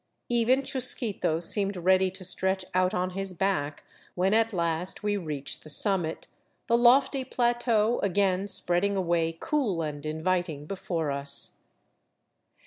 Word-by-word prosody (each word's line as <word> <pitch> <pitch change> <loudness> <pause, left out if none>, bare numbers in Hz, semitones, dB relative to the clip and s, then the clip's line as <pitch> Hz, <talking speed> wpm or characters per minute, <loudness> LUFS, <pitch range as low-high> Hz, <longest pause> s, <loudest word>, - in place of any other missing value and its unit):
Even 240 +3 +2
Chusquito 250 -10 -1
seemed 195 +3 -1
ready 185 +1 +2
to 190 0 -7
stretch 190 +1 +2
out 185 0 +2
on 185 -3 -2
his 195 0 -5
back 165 -6 -2 0.3
when 185 +3 +1
at 225 +1 +2
last 170 0 -1
we 205 0 0
reached 150 -7 -6
the 155 - -12
summit, 175 0 -1 0.4
the 235 - +2
lofty 260 +3 +4
plateau 240 -2 0
again, 195 0 0
spreading 195 +1 +4
away 170 -3 0
cool 220 - -1
and 145 -2 -6
inviting 160 -1 -2
before 165 -4 -3
us. 140 0 0
190 Hz, 135 wpm, -27 LUFS, 165-215 Hz, 0.4 s, lofty